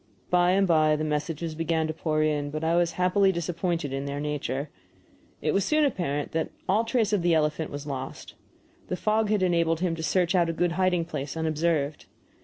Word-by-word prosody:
By 180 0 +4
and 195 +1 +3
by 155 -2 +4
the 155 - -2
messages 155 +2 -2
began 160 0 0
to 155 - -3
pour 155 -1 0
in, 150 -2 0
but 155 +2 -4
I 165 +1 +2
was 170 -1 +2
happily 185 +3 +3
disappointed 170 -3 -2
in 135 +1 -3
their 140 0 -3
nature. 145 -1 -3 0.7
It 150 - +1
was 195 - +2
soon 305 +5 +3
apparent 155 - -2
that 160 0 -1 0.2
all 215 +4 +2
trace 225 -3 +1
of 205 - +2
the 170 -1 +3
elephant 155 0 0
was 145 0 -7
lost. 135 -2 -6 0.5
The - - -2
fog 215 +1 +1
had 210 -3 +2
enabled 170 -2 +2
him 175 -3 0
to 165 - -6
search 175 +2 +1
out 175 -2 +3
a - - -1
good 175 +1 +1
hiding 180 -1 +1
place 150 -1 -5
unobserved. 155 -2 -1
165 Hz, 205 wpm, -26 LUFS, 150-180 Hz, 0.7 s, By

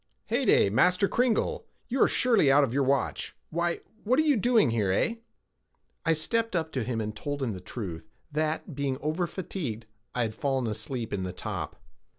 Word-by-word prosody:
"Heyday, 100 - +3
Master 180 - +4
Cringle, 245 0 +1 0.2
you 255 +1 -1
are - - +7
surely 230 - +4
out 145 +1 +6
of 125 -4 0
your 140 - +2
watch. 135 +1 0 0.2
Why, 170 +1 0 0.2
what 250 +5 +2
are 310 - +5
you 300 -3 +4
doing 220 - +4
here, 105 -4 +1
eh?" 230 - +1 0.9
I 165 - +5
stepped 225 +7 0
up 160 -2 -1
to 130 -5 -1
him 120 -1 -2
and 110 -1 -3
told 145 +5 -3
him 120 - 0
the 95 -3 -6
truth, 90 -5 -6 0.2
that, 155 +2 -1
being 140 -1 -1
over 155 +4 -1
fatigued, 165 - -5 0.3
I 125 - +2
had 110 -1 -2
fallen 135 +1 -1
asleep 115 +2 -3
in 100 - -1
the 90 -1 -4
top. - - -5
145 Hz, 185 wpm, -28 LUFS, 115-180 Hz, 0.9 s, are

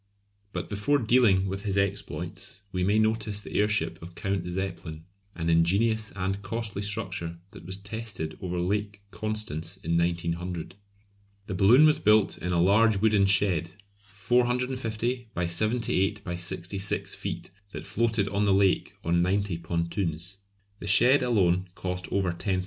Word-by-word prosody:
But - - -4
before 105 +8 +1
dealing 115 -6 +4
with 95 +1 -3
his 100 -2 -1
exploits 100 0 -3
we 90 -1 -1
may 100 +3 +3
notice 110 -1 +1
the 105 - -9
airship 105 +1 0
of 85 +1 -10
Count 95 -2 -2
Zeppelin, 90 -3 -5 0.3
an 85 -1 -3
ingenious 100 +7 +2
and 95 +1 -2
costly 105 0 -4
structure 95 -5 -3
that 85 - -12
was 95 +1 -1
tested 100 -5 -5
over 90 -1 -3
Lake 100 +3 -2
Constance 105 -6 -3
in 85 -2 0
1900. 85 0 -2 0.7
The 100 - -5
balloon 110 +11 +6
was 155 -1 +4
built 105 -1 +3
in 90 - -3
a 85 - +2
large 105 +4 +4
wooden 105 -1 +3
shed, 95 -3 +2 0.3
450 120 +3 -1
by 85 - 0
78 105 +2 0
by 90 -1 -4
66 90 +3 -2
feet, - - -5 0.2
that - - -7
floated 115 -3 0
on 100 +1 0
the 100 - +4
lake 95 -1 +2
on 85 +1 +2
ninety 95 -1 0
pontoons. 85 +2 -2 0.4
The 105 - -7
shed 125 +7 +6
alone 95 -7 +2
cost 90 0 -4
over 95 -3 +1
£10,000. 95 +2 -1
100 Hz, 150 wpm, -27 LUFS, 90-110 Hz, 0.7 s, balloon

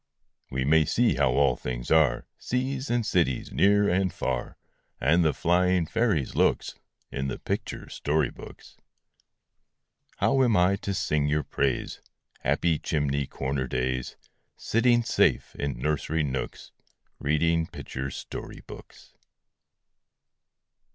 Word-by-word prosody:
We 65 0 -2
may 80 +2 +5
see - - +2
how - - +2
all 70 -3 +3
things - - -5
are, 75 -6 +3
Seas 130 +2 -2
and 120 -2 +1
cities, 85 - 0
near 100 +1 +4
and 95 0 +1
far, 65 -7 -3 0.4
And 80 +6 +3
the 80 - +3
flying 90 +2 +2
fairies' 105 - 0
looks, - - +1 0.4
In 65 0 -2
the 65 - -3
picture - - -4
story 75 -2 0
books. - - -13 1.4
How 135 -1 +2
am 115 -4 +3
I 90 +2 +4
to 100 0 -3
sing 75 -4 0
your 75 0 +1
praise, 70 -1 -2 0.4
Happy 75 +4 +1
chimney 70 -2 -1
corner 65 0 -3
days, 65 0 -2 0.4
Sitting 120 +1 +2
safe - - +2
in 70 -3 -3
nursery 75 +4 -1
nooks, 65 -2 -4 0.5
Reading 80 +3 +1
picture 65 +1 -6
story - - -8
books? - - -13
75 Hz, 125 wpm, -27 LUFS, 65-90 Hz, 1.4 s, may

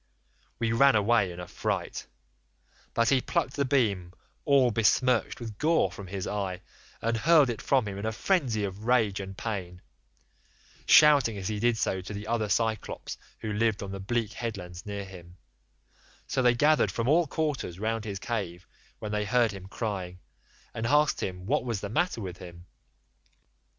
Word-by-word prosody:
We 115 -1 0
ran 135 +3 +5
away 105 -2 +3
in 85 - -9
a 90 - -7
fright, - - -3 0.9
but 115 -1 +3
he 135 -2 +3
plucked 150 -3 -1
the 140 - 0
beam 100 -10 +1 0.3
all 135 -4 +4
besmirched 115 +2 +2
with 110 -4 -8
gore 165 +2 +2
from 100 - -9
his 95 0 -4
eye, 95 -3 -3 0.4
and 115 +1 +1
hurled 145 +2 +5
it 115 - -6
from 130 -6 +2
him 100 -1 -5
in 100 - -4
a - - 0
frenzy 125 - 0
of 100 +2 -5
rage 115 -5 +2
and 95 0 -7
pain, 90 -6 -4 1.1
shouting 140 -8 +6
as 95 0 -3
he 105 -1 -2
did 120 +1 +2
so 95 -3 -1
to 100 +3 -7
the 105 +1 -6
other 110 -2 -1
Cyclopes 110 +1 -2 0.2
who 110 -1 -3
lived 110 -1 +1
on 100 - -6
the 100 - -5
bleak 110 +2 -2
headlands 95 -6 -6
near 100 -1 -4
him; 90 -2 -13 0.9
so 130 - -1
they 125 -1 +4
gathered 150 +5 +3
from 115 0 -2
all 165 +3 +4
quarters 145 - -2
round 110 +2 -2
his 100 -2 -4
cave 95 -5 -4 0.3
when 105 - -6
they 105 0 -1
heard 120 +1 +2
him 95 -1 -9
crying, 95 -4 -4 0.6
and 115 0 -2
asked 150 +2 +3
what 95 +10 -1
was 115 -5 -2
the 100 - -5
matter 120 - 0
with 90 -3 -6
him. 85 -1 -11
110 Hz, 175 wpm, -28 LUFS, 95-120 Hz, 1.1 s, shouting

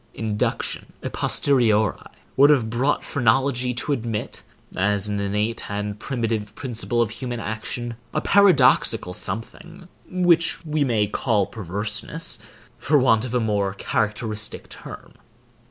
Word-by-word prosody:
Induction, 110 -2 -2
a - - -4
posteriori, 110 -7 +2 0.4
would 140 +2 +6
have 125 -7 +3
brought 130 +5 0
phrenology 130 0 +1
to 135 - -2
admit, 115 -5 -4 0.3
as 100 +1 +1
an 105 -1 -2
innate 105 +3 -2
and 105 0 -4
primitive 110 -4 -3
principle 120 -2 0
of 110 - -5
human 120 +1 -4
action, 115 +2 -4 0.2
a 155 - 0
paradoxical 185 - +4
something, 165 - -6 0.2
which 175 -2 +2
we 155 -1 0
may 115 -6 +2
call 105 -1 0
perverseness, 105 - -2 0.4
for 150 +1 +3
want 125 -4 +3
of 125 0 -4
a - - +3
more 100 -3 0
characteristic 105 +1 -3
term. - - -11
115 Hz, 125 wpm, -23 LUFS, 105-135 Hz, 0.4 s, would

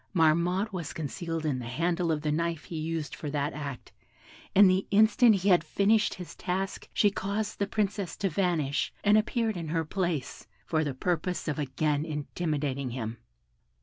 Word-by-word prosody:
Marmotte 175 +5 +2
was 170 -5 -4
concealed 165 +1 -4
in 140 -4 0
the 120 - -6
handle 170 +6 0
of 155 -1 -1
the 150 - +1
knife 170 +1 -1
he 170 - -8
used 160 -1 -3
for 150 - -5
that 145 0 -1
act, 140 -4 -6 0.6
and 200 +1 +9
the 185 +1 +2
instant 220 +2 +5
he 195 +1 +1
had 175 -3 +5
finished 205 +6 +2
his 180 -2 -9
task 190 +1 -3
she 205 - +3
caused 205 +2 -3
the 200 - +1
Princess 205 -3 -2
to 195 - 0
vanish, 160 -6 0
and 210 0 +5
appeared 220 0 +1
in 170 -2 -4
her 160 +1 -1
place, 170 -5 -3 0.2
for 160 -1 +1
the 140 -3 -3
purpose 175 +4 -1
of 150 0 -1
again 145 +1 0
intimidating 150 -3 -2
him!" 115 -2 -5
165 Hz, 175 wpm, -29 LUFS, 150-195 Hz, 0.6 s, and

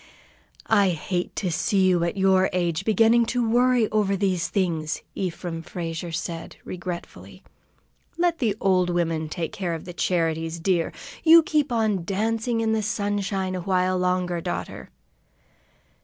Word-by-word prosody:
"I 205 -3 +4
hate 175 +1 -3
to 185 -4 -1
see 190 +4 +1
you 180 -2 +3
at 170 +3 -2
your 190 -1 +3
age, 175 0 -1
beginning 225 +2 +4
to 240 0 0
worry 245 0 +3
over 205 -2 +1
these 185 -3 0
things," 165 -5 -1
Ephraim 175 -2 -4
Frazier 165 -1 -5
said, 165 0 -5
regretfully. 180 -1 -7 0.7
"Let 345 -1 +1
the 220 -7 +1
old 185 -2 +2
women 165 -3 -1
take 165 +1 -3
care 175 -4 -2
of 160 - -8
the 175 - -8
charities, 165 -1 -1
dear. 170 -1 +1 0.3
You 330 0 +8
keep 300 -5 0
on 215 -6 +1
dancing 225 +5 -1
in 220 -1 +1
the 220 0 +1
sunshine 200 -3 -1
a 185 - -3
while 185 0 +1
longer, 180 -1 0
daughter." 85 - -5
185 Hz, 145 wpm, -24 LUFS, 170-215 Hz, 0.7 s, You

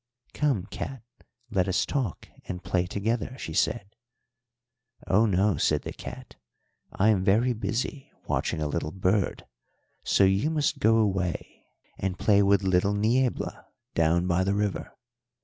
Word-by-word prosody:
"'Come, 135 -11 0
cat, 135 -4 -6 0.5
let 95 -3 +1
us 95 - +1
talk 130 - -3 0.2
and 90 -1 -6
play 90 -2 0
together,' 110 +6 -2
she - - -6
said. 105 -3 -1 1.1
"'Oh 105 +4 +3
no,' 100 0 +2
said - - +1
the - - -6
cat. - - -10 0.6
'I 105 +3 +3
am 100 -4 +3
very 110 +6 +3
busy 125 +4 -3 0.2
watching 80 -2 -1
a - - 0
little 80 +1 -2
bird, 95 +2 0 0.6
so - - +3
you 95 +9 +3
must 150 -2 0
go 110 -5 +4
away 95 -5 -1 0.3
and 95 -1 -2
play 100 -2 +4
with 100 0 +3
little 95 +2 +2
Niebla 120 +5 0 0.3
down 85 +2 +2
by 90 0 +2
the 100 +1 0
river.' 105 -1 -2
100 Hz, 145 wpm, -27 LUFS, 95-115 Hz, 1.1 s, go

